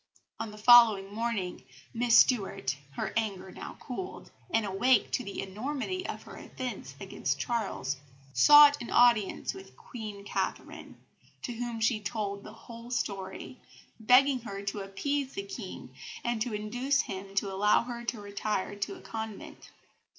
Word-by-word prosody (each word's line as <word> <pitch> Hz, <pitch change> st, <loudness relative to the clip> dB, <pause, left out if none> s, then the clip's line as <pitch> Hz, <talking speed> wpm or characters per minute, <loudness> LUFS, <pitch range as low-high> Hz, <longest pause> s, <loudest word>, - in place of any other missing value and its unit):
On 225 Hz, -, -3 dB
the 210 Hz, -, -11 dB
following 215 Hz, -3 st, +7 dB
morning 220 Hz, -5 st, -2 dB, 0.3 s
Miss 235 Hz, 0 st, +4 dB
Stuart, 195 Hz, -, +3 dB, 0.2 s
her -, -, -3 dB
anger 200 Hz, -4 st, -2 dB
now -, -, -9 dB
cooled, 370 Hz, +9 st, -7 dB, 0.2 s
and 225 Hz, -10 st, +1 dB
awake 205 Hz, +4 st, +2 dB
to -, -, 0 dB
the 200 Hz, 0 st, -5 dB
enormity 280 Hz, -, -4 dB
of -, -, -6 dB
her -, -, -11 dB
offence 255 Hz, -1 st, -6 dB
against -, -, -2 dB
Charles, 205 Hz, -, -2 dB, 0.4 s
sought 290 Hz, -, +8 dB
an 235 Hz, -, -6 dB
audience 235 Hz, -5 st, +3 dB
with 385 Hz, 0 st, -13 dB
Queen 210 Hz, -4 st, -8 dB
Catherine, -, -, -4 dB, 0.4 s
to 245 Hz, -, -3 dB
whom 235 Hz, -1 st, -4 dB
she 220 Hz, 0 st, +2 dB
told 205 Hz, -2 st, -3 dB
the -, -, -10 dB
whole 230 Hz, +1 st, -11 dB
story, 195 Hz, -, -4 dB, 0.4 s
begging 255 Hz, +4 st, +5 dB
her 200 Hz, -4 st, -7 dB
to 200 Hz, +1 st, -3 dB
appease 270 Hz, +8 st, -2 dB
the 395 Hz, -, -4 dB
King, 395 Hz, -1 st, -8 dB, 0.3 s
and 240 Hz, -2 st, -1 dB
to 240 Hz, -, -1 dB
induce 245 Hz, +7 st, 0 dB
him 195 Hz, +1 st, -7 dB
to 200 Hz, -1 st, 0 dB
allow 210 Hz, +4 st, +3 dB
her 235 Hz, -1 st, -6 dB
to 235 Hz, -1 st, -3 dB
retire 205 Hz, 0 st, -3 dB
to 200 Hz, 0 st, -3 dB
a -, -, -13 dB
convent. 220 Hz, -2 st, -7 dB
220 Hz, 150 wpm, -30 LUFS, 200-245 Hz, 0.4 s, sought